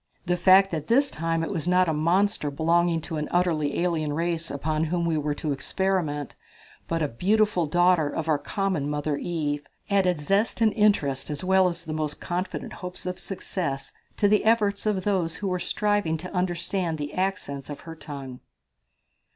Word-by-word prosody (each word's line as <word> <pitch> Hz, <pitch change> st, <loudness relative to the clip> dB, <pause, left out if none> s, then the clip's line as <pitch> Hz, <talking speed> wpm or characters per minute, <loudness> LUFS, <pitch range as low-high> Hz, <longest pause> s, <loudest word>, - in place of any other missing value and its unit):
The 175 Hz, 0 st, +1 dB
fact 190 Hz, +2 st, +6 dB
that 155 Hz, -3 st, -3 dB
this 270 Hz, +4 st, +3 dB
time 165 Hz, 0 st, -1 dB
it -, -, -3 dB
was 165 Hz, +1 st, -2 dB
not 180 Hz, 0 st, +4 dB
a 160 Hz, -, +1 dB
monster 170 Hz, +1 st, +1 dB
belonging 165 Hz, +3 st, +2 dB
to 160 Hz, 0 st, -5 dB
an 150 Hz, -, -2 dB
utterly 160 Hz, -5 st, +1 dB
alien 160 Hz, -4 st, 0 dB
race 165 Hz, +1 st, -1 dB
upon 155 Hz, +2 st, -1 dB
whom 170 Hz, +1 st, -1 dB
we 165 Hz, -1 st, +1 dB
were 150 Hz, -1 st, -1 dB
to 150 Hz, 0 st, -3 dB
experiment, 150 Hz, -1 st, -1 dB, 0.5 s
but 165 Hz, -1 st, 0 dB
a -, -, +1 dB
beautiful 185 Hz, -, +1 dB
daughter 175 Hz, -1 st, +3 dB
of 160 Hz, +2 st, -3 dB
our 155 Hz, -2 st, +2 dB
common 175 Hz, -2 st, -1 dB
Mother 150 Hz, 0 st, -1 dB
Eve, 145 Hz, -3 st, -2 dB, 0.3 s
added 185 Hz, -4 st, +3 dB
zest 195 Hz, +11 st, +1 dB
and 220 Hz, -2 st, +3 dB
interest 180 Hz, -, +2 dB
as 150 Hz, +3 st, -4 dB
well 190 Hz, 0 st, +4 dB
as 175 Hz, -1 st, -3 dB
the 160 Hz, -2 st, -5 dB
most 155 Hz, -1 st, -3 dB
confident 180 Hz, +2 st, -4 dB
hopes 180 Hz, 0 st, -6 dB
of 180 Hz, 0 st, -3 dB
success 170 Hz, -7 st, -4 dB, 0.2 s
to 205 Hz, -, +4 dB
the 210 Hz, +1 st, +3 dB
efforts 215 Hz, -2 st, +2 dB
of 195 Hz, -3 st, 0 dB
those 180 Hz, -5 st, 0 dB
who 200 Hz, -, -4 dB
were 180 Hz, -1 st, -1 dB
striving 205 Hz, -4 st, 0 dB
to 180 Hz, +5 st, -8 dB
understand 180 Hz, -1 st, -1 dB
the 145 Hz, -1 st, -5 dB
accents 185 Hz, -8 st, -2 dB
of 145 Hz, -, -7 dB
her 165 Hz, -1 st, -9 dB
tongue. 140 Hz, -5 st, -8 dB
170 Hz, 185 wpm, -26 LUFS, 150-190 Hz, 0.5 s, fact